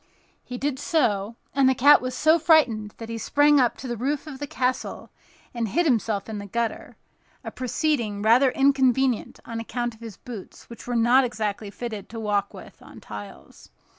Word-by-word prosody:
He 250 - -7
did 270 0 -2
so; 230 - 0 0.2
and 270 -1 +4
the 265 - +2
cat 285 +4 +6
was 255 0 -4
so 315 +4 +4
frightened 250 -11 +3
that 225 - -8
he 230 0 -5
sprang 290 +5 +4
up 245 -2 +2
to 265 - -7
the 240 - -3
roof 275 +6 -2
of 285 -4 -9
the 290 - -4
castle 255 -1 -3 0.4
and 235 -2 -2
hid 345 - +1
himself 225 -7 0
in 215 -2 -5
the 200 - -8
gutter—a 230 +3 -6
proceeding 245 -5 -1
rather 245 +5 +5
inconvenient 265 -2 +1
on 230 -1 -5
account 240 +1 -3
of 225 - -19
his 225 -4 -9
boots, 230 -6 -10
which 235 - -11
were 245 - -2
not 240 +3 +4
exactly 215 -3 -3
fitted 215 -1 -7
to 225 - -7
walk 205 -2 -1
with - - -13
on - - -13
tiles. 105 -1 -11
240 Hz, 185 wpm, -24 LUFS, 220-270 Hz, 0.4 s, cat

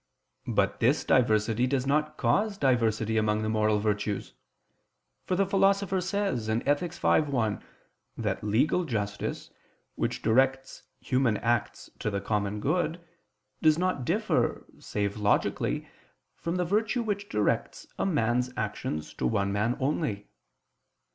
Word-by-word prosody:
But - - +1
this - - +2
diversity 110 0 +3
does 130 -1 0
not 150 +2 0
cause 210 -1 +1
diversity 115 - +1
among 110 0 +1
the 110 - -1
moral 110 -1 +2
virtues: 105 -1 -2 0.9
for 185 - 0
the 195 +2 +2
Philosopher 195 0 +2
says 190 - -1
(Ethic. 145 +9 0
v, - - -2
1) 120 -9 -1 0.5
that - - -2
legal 120 - +2
justice, 105 - -3 0.4
which - - -3
directs 135 +3 +1 0.2
human 125 -5 +1
acts 120 -2 -1
to - - -1
the 100 -1 -2
common 105 0 -1
good, 170 +6 0 0.6
does 155 -1 +5
not 180 -6 0
differ, - - 0
save 100 0 -2
logically, 105 -1 0 0.5
from 170 +1 -3
the 180 -1 0
virtue 220 +6 +1
which 205 -2 -3
directs 105 -1 -1
a - - +1
man's 125 -6 +1
actions 100 -7 -3
to - - -1
one 100 -3 0
man 110 +4 0
only. 130 -7 -1
125 Hz, 130 wpm, -28 LUFS, 105-170 Hz, 0.9 s, does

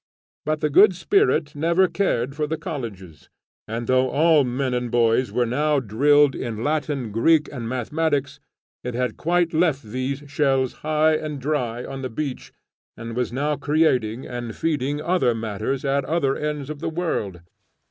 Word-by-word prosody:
But 155 0 0
the 150 - 0
Good 190 +5 +6
Spirit 180 - +2
never 170 +5 +3
cared 160 -8 -1
for 150 0 -1
the 160 +1 -2
colleges, 115 - -7 0.4
and 115 +2 -4
though 130 +1 +2
all 155 0 +4
men 130 +1 -1
and 125 -1 -1
boys 120 +1 +2
were 125 - +1
now 145 +5 +1
drilled 140 +5 +3
in 115 -2 -4
Latin, 145 -5 -1
Greek, 150 +8 +3
and 115 -4 -5
Mathematics, 140 +3 -1 0.4
it 125 -1 -4
had 125 -2 -1
quite 175 0 +1
left 160 -4 +2
these 130 +5 -4
shells 135 -2 +1
high 155 +1 +2
and 150 -2 -5
dry 125 -4 -2
on 135 0 -6
the 130 - -4
beach, 135 +2 -5 0.5
and 115 0 -7
was 125 -1 -1
now 145 +4 0
creating 135 -6 +1
and 120 -2 -6
feeding 145 -3 -1
other 150 -7 +1
matters 110 +5 -3
at 140 0 +1
other 145 -3 +1
ends 150 -1 -3
of 150 - -7
the - - -2
world. 155 - -3
140 Hz, 165 wpm, -23 LUFS, 120-155 Hz, 0.5 s, Good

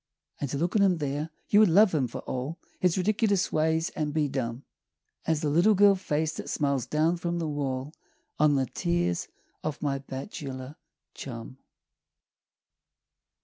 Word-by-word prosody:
And 140 - -2
to 140 - -2
look 170 +6 -1
on 210 - +5
him 190 -3 +4
there 145 +1 -2 0.2
you 205 - +6
would 215 -3 +6
love 200 +3 +6
him, 140 -5 +2
for 115 - -7
all 130 +6 -4 0.2
His 180 -1 +2
ridiculous 200 0 +1
ways, 160 +1 +1
and 150 -1 -3
be 150 -2 +2
dumb 130 -2 -3 0.6
As 160 -2 +1
the 150 - 0
little 175 +8 +5
girl 200 +1 +7
face 160 -5 -1
that - - -6
smiles 140 -4 0
down 160 +3 +2
from 170 0 -2
the 165 -2 -2
wall 140 -1 -3 0.5
On 150 -1 +5
the 135 -1 +2
tears 85 -5 -1 0.4
of 155 -1 -3
my 140 -2 0
bachelor 135 -1 -7 0.4
chum. 125 0 -8
150 Hz, 160 wpm, -28 LUFS, 135-170 Hz, 0.6 s, girl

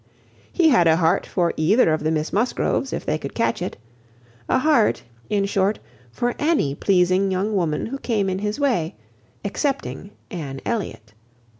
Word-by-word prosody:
He 335 -3 +4
had 205 - +5
a 160 - +5
heart 165 +2 +2
for 175 -2 0
either 165 +2 +4
of 155 - -2
the 155 - +1
Miss 155 0 -1
Musgroves, 250 +4 0
if - - -4
they 155 +1 0
could 140 - -7
catch 230 - 0
it; 180 - -4 0.7
a - - +4
heart, 260 -5 +3 0.3
in 200 -1 +1
short, 200 +1 +1 0.3
for 240 - -1
any 295 - +1
pleasing 185 +3 +2
young 195 +3 -1
woman 160 -5 0
who 275 +4 -5
came 215 -7 0
in 190 0 -1
his 210 +5 -3
way, 230 - 0 0.5
excepting 200 - -2 0.2
Anne 140 -7 -5
Elliot. 145 - -4
195 Hz, 165 wpm, -22 LUFS, 160-230 Hz, 0.7 s, had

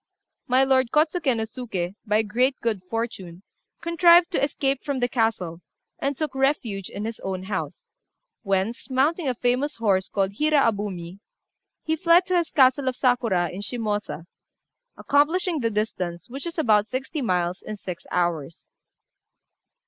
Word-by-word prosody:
My 255 +2 +4
lord 260 -2 +3
Kôtsuké 305 -3 +2
no 220 - -1
Suké, 210 -6 -4
by 210 +1 +3
great 250 +6 +1
good 225 -5 -1
fortune, 200 -6 -4 0.4
contrived 340 +1 +5
to 340 - 0
escape 275 -1 0
from 280 -3 -2
the 245 - +2
castle, 220 -9 -1 0.4
and 275 -1 -1
took 310 -3 -2
refuge 265 -8 -1
in 205 - -5
his 225 0 -5
own 190 -1 -4
house, 195 0 -4 0.6
whence, 195 +5 -1
mounting 290 +5 +1
a 255 - 0
famous 250 +5 0
horse 195 -4 +1
called 195 -1 0
Hira 305 0 +3
Abumi, 200 -6 -2 0.6
he 320 - 0
fled 340 +2 +4
to 370 - 0
his 340 -2 0
castle 260 0 +4
of 255 - 0
Sakura, 235 -9 +1
in 190 - -6
Shimôsa, 210 -6 -3 0.7
accomplishing 325 +4 +2
the 230 -3 0
distance, 185 -5 -3
which 275 +6 -5
is 340 +1 -6
about 215 -8 +3
sixty 265 +4 -4
miles, 180 -5 0
in 215 - -6
six 180 -4 -8
hours. 170 -3 -2
235 Hz, 150 wpm, -24 LUFS, 195-280 Hz, 0.7 s, contrived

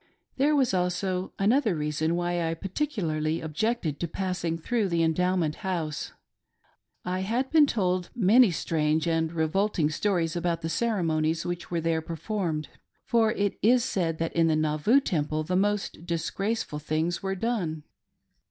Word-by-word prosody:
There 290 +3 +3
was 265 -7 +2
also 180 +1 -1
another 220 0 +2
reason 150 +2 -1
why 175 -1 0
I 165 - -2
particularly 165 - -2
objected 160 - -2
to 170 - -1
passing 180 -1 -2
through 210 +4 -1
the 170 -1 +1
Endowment 165 -1 +1
House. 165 -5 -3 0.9
I 185 +1 -1
had 235 +8 -1
been' 310 -2 +6
told 185 -6 0
many 230 +2 +6
strange 155 -2 0
and 165 -1 +1
revolting 165 0 +1
stories 170 -3 0
about 170 -1 -1
the 165 - -3
ceremonies 165 -5 0
which 175 -1 -4
were 170 -1 -1
there 165 0 0
performed, 165 -1 -3 0.4
for 225 -2 +3
it 205 -1 -1
is 240 +2 +4
said 170 -9 -1
that 165 0 -2
in 165 -1 +3
the 160 - +3
Nauvoo 155 - +3
Temple 155 - -1
the 180 +4 -2
most 205 -3 0
disgraceful 170 +1 -2
things 155 +3 -1
were 195 0 -2
done. 180 -8 -2
175 Hz, 150 wpm, -27 LUFS, 160-205 Hz, 0.9 s, been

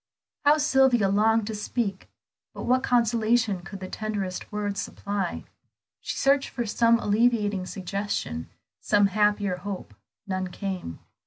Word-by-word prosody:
How 295 +1 +6
Sylvia 265 -8 +4
longed 220 +2 +3
to 220 - -4
speak! 210 -2 -3 0.5
But - - -6
what 255 +1 +3
consolation 230 -4 +2
could 195 +1 -9
the 185 - -5
tenderest 200 -3 -4
words 205 -1 -2
supply? 200 -3 -3 0.6
She - - -5
searched 275 0 +3
for 240 - -3
some 230 +2 +3
alleviating 210 -3 +1
suggestion, 190 - -3 0.3
some 205 -1 +3
happier 205 -3 +2
hope; 195 +1 -6 0.3
none 185 -1 -2
came. 180 - -5
210 Hz, 130 wpm, -26 LUFS, 195-230 Hz, 0.6 s, How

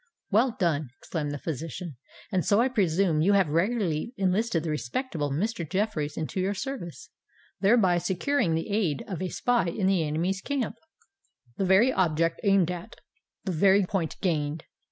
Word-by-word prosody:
"Well 230 +3 +3
done!" 155 - 0
exclaimed 155 -4 -3
the 145 - -3
physician. 160 +2 -5 0.4
"And 185 -3 +1
so 205 - +3
I 250 +3 +3
presume 180 -7 +2
you 195 +5 +4
have 195 -5 +3
regularly 185 - 0
enlisted 190 -2 +1
the 160 - -2
respectable 150 - -2
Mr. 185 +7 -1
Jeffreys 185 -6 -1
into 160 +4 -3
your 195 +2 0
service—thereby 195 - -1
securing 180 - 0
the 165 +6 -3
aid 185 -9 0
of 185 -3 -5
a 185 - -2
spy 240 -4 +1
in 185 +3 -1
the 190 -3 +3
enemy's 170 +5 -1
camp." 275 -3 -2 0.8
"The 195 - 0
very 195 +8 +5
object 165 -2 +1
aimed 195 -4 +3
at—the 205 - -9
very 195 +3 +4
point 180 -4 -2
gained! 155 -4 -1
185 Hz, 155 wpm, -27 LUFS, 160-205 Hz, 0.8 s, very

